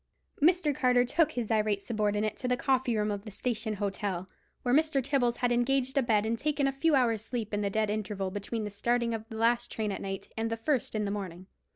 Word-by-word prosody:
Mr. 325 -1 +4
Carter 250 -1 +3
took 300 +6 +2
his 240 -2 -3
irate 215 -2 +2
subordinate 210 0 0
to 250 - -3
the 250 0 +2
coffee 255 -3 +1
room 210 0 +1
of 200 -1 -4
the 215 - -8
Station 220 0 -2
Hotel, 195 -2 -2 0.4
where 245 - +1
Mr. 310 -1 +3
Tibbles 260 -3 +1
had 245 0 0
engaged 260 +2 +1
a 275 - +4
bed 220 -4 +2
and 225 +1 -1
taken 295 -1 0
a 275 - +2
few 295 +3 +2
hours' 230 -5 +2
sleep 225 -3 -4
in 205 - 0
the 200 - 0
dead 215 +1 0
interval 205 -2 -3
between 205 +3 -4
the 210 - -4
starting 235 +3 0
of 225 0 -5
the 220 - -7
last 235 +2 +2
train 215 -2 -2
at - - -4
night 195 -1 -5
and 225 0 -1
the 225 - -2
first 245 0 -1
in 210 -1 0
the 200 - -2
morning. 185 -3 -5
225 Hz, 235 wpm, -30 LUFS, 210-250 Hz, 0.4 s, Mr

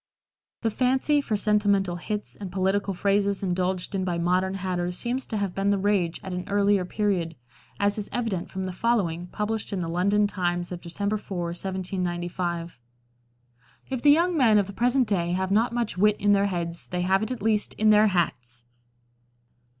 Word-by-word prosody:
The 225 - 0
fancy 265 +5 +2
for 220 -6 -1
sentimental 200 -3 +2
hits 210 +4 -4
and 195 -3 -7
political 195 +1 0
phrases 200 +1 +1
indulged 185 +1 -1
in 190 -1 -1
by 175 -2 -1
modern 185 +2 +1
hatters 180 -2 -2
seems 250 +2 -2
to 220 - -3
have 200 -3 -2
been 195 +1 0
the 200 - +3
rage 190 -4 +1
at 190 - -5
an 180 +3 -5
earlier 200 -1 +2
period, 180 -4 -1 0.4
as 205 +1 +2
is 205 - -4
evident 225 -8 -2
from 190 0 -4
the 185 - -3
following, 180 -5 0
published 210 +3 -3
in 200 - -2
the 170 - -2
London 200 +5 +2
Times 175 -3 -2
of 175 -1 -6
December 200 +5 -2
4, 195 -2 -7
1795: 175 -2 -3 1.1
"If 260 -2 -2
the 290 - +5
young 340 +4 +4
men 235 -8 +5
of 205 - +3
the 200 - -9
present 245 +3 +2
day 175 -4 0
have 190 +1 -1
not 225 +4 +3
much 235 -6 -2
wit 210 +1 +4
in 205 - +3
their 200 0 +4
heads 170 -3 -3
they 180 0 -2
have 190 +2 +2
it 220 - -2
at 255 -5 -5
least 215 -1 +1
in 215 0 +4
their 210 +1 +6
hats." 125 - -1
195 Hz, 185 wpm, -26 LUFS, 180-210 Hz, 1.1 s, their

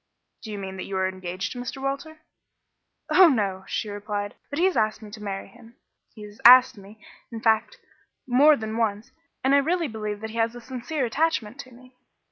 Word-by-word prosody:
"Do 220 - -8
you 205 - -5
mean 190 -1 -6
that 185 - -5
you 195 - -3
are 190 0 +1
engaged 185 0 -5
to 250 - -7
Mr. 245 +2 -6
Walter?" 280 +4 -5 0.9
"Oh, 370 -1 +8
no," 195 -7 -1
she 220 - -3
replied; 205 0 -4 0.2
"but 285 - -5
he 345 - +3
has 380 - +1
asked 215 0 0
me 210 - -11
to 215 0 -10
marry 195 -2 -5
him 230 +4 -18 0.4
he 215 - -10
has 210 0 -13
asked 255 +2 +8
me, 205 +1 -15 0.3
in 230 - -6
fact, 225 - +1 0.5
more 285 +4 +5
than 220 0 -5
once; 215 -2 -2 0.3
and 265 +1 +3
I 280 - +6
really 330 +3 0
believe 215 -3 -5
that 220 0 -6
he 230 - -8
has 230 +1 0
a - - -8
sincere 260 +3 -4
attachment 255 -3 -1
to 255 - -9
me." 255 +1 -18
225 Hz, 210 wpm, -25 LUFS, 205-265 Hz, 0.9 s, Oh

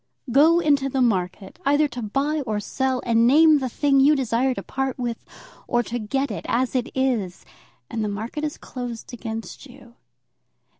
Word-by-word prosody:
Go 315 +6 +5
into 285 -4 +2
the 265 - -2
market, 190 - -1
either 290 +2 +3
to 245 - -6
buy 275 +8 -1
or 215 -1 -1
sell, 260 +4 -2
and 230 0 +3
name 305 +3 +6
the 260 -2 -2
thing 275 +2 +2
you 290 +3 +5
desire 255 0 0
to - - -6
part 270 -1 -3
with 240 -2 -4 0.4
or 240 0 +1
to 240 +1 -4
get, 270 +4 -2 0.2
as 250 +2 0
it 250 -1 0
is, 220 - -1 0.4
and 225 -1 -3
the 210 - -1
market 220 +9 -5
is 300 -1 -3
closed 245 -1 -7
against 225 +3 -7
you. 250 -2 -16
255 Hz, 170 wpm, -23 LUFS, 230-275 Hz, 0.4 s, name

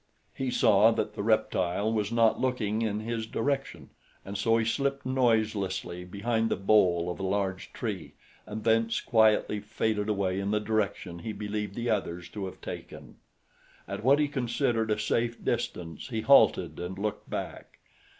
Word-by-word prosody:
He 135 -1 -2
saw 110 -3 +5
that 105 - -2
the 105 - -4
reptile 110 -1 +1
was 105 -1 -1
not 115 -1 +3
looking 115 -4 0
in 105 -1 -1
his 115 0 -3
direction, 135 - -2 0.3
and 100 - -6
so 115 +3 +2
he 110 - +1
slipped 140 +3 -1
noiselessly 110 -8 0
behind 115 +4 -1
the - - +1
bole 95 -4 +3
of 90 - -7
a - - -4
large 95 -1 -2
tree - - -5 0.3
and 105 +1 -6
thence 115 0 +2
quietly 110 -2 +3
faded 105 0 -1
away 95 -2 0
in 100 0 -2
the 105 0 +2
direction 105 -5 -2
he 110 +5 -5
believed 105 -1 -4
the 120 0 -1
others 90 -4 -2
to 100 0 -5
have 95 - -11
taken. - - -9 0.7
At - - -5
what 135 +4 +5
he 150 0 +2
considered 120 -4 0
a 105 - +2
safe 115 0 -1
distance 90 -8 -3
he 115 -4 -3
halted 135 +5 +4
and 90 +2 -5
looked 105 +1 -4
back. - - -6
110 Hz, 165 wpm, -28 LUFS, 100-115 Hz, 0.7 s, saw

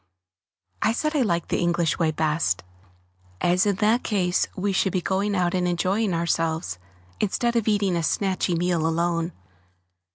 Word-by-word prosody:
I 220 - +2
said 305 +5 -1
I 290 - +3
liked 170 -8 0
the - - 0
English 170 -2 +1
way 165 -2 +2
best, 150 - 0 0.8
as 180 +3 +2
in 200 - +2
that 220 +5 +2
case 180 -4 +1
we 195 +1 -1
should 190 +1 +1
be 185 - +2
going 195 +3 -1
out 175 -2 +1
and 180 -1 +1
enjoying 190 +4 0
ourselves, 165 - -1 0.4
instead 235 +3 0
of 230 -2 +1
eating 200 -4 +2
a - - +1
snatchy 185 +1 0
meal 170 -2 +1
alone. 170 +1 0
180 Hz, 160 wpm, -24 LUFS, 170-205 Hz, 0.8 s, I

